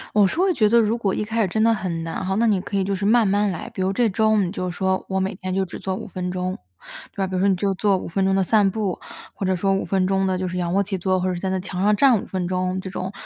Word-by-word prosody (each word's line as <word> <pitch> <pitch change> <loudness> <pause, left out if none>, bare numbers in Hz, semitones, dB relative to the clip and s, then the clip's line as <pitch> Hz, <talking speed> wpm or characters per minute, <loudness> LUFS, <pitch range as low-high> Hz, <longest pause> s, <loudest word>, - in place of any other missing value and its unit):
我 205 -2 +6
是 250 - -3
会 375 +1 +3
觉 215 -9 +3
得 235 +2 +5
如 220 0 +2
果 205 -5 -1
一 210 - -2
开 225 +2 -1
始 205 - +2
真 220 +4 0
的 230 0 +4
很 175 -5 -3
难 165 +3 -4
哈， 190 +1 -1
那 230 - +2
你 205 -5 +2
可 200 - -4
以 195 - +1
就 195 +1 -1
是 190 - -5
慢 220 +1 +4
慢 205 +1 +2
来。 175 - -5
比 - - -5
如 190 +1 +1
这 235 +4 +2
周 220 +1 +2
你 185 -4 +1
就 185 -2 -3
说 190 +1 -1
我 190 - 0
每 190 +2 -1
天 185 -1 -5
就 190 0 +1
只 175 - -9
做 190 -1 -3
5 - - -7
分 180 -1 -5
钟， 185 0 -3 0.5
对 - - -31
吧？ 195 - +1
比 190 - -7
如 185 - 0
说 195 - +3
你 195 - +3
就 195 +1 0
做 195 0 +1
5 - - -6
分 195 +3 -1
钟 190 0 +2
的 195 - +2
散 205 +1 +3
步， 200 -2 -2 0.3
或 - - -6
者 190 0 +1
说 195 +2 +1
5 195 - 0
分 190 -1 0
钟 195 0 +1
的 185 -1 0
就 185 0 -2
是 180 - -5
仰 175 -1 -1
卧 200 - +3
起 195 -1 -4
坐， 185 +1 +1
或 180 - -2
者 185 - 0
是 175 - -4
在 190 - -1
那 190 0 -1
墙 185 0 -5
上 210 +1 +4
站 245 -3 +4
5 - - -10
分 185 -2 -3
钟， 185 0 -1
这 190 0 -7
种， 185 +1 -4
190 Hz, 345 characters per minute, -22 LUFS, 185-205 Hz, 0.5 s, 我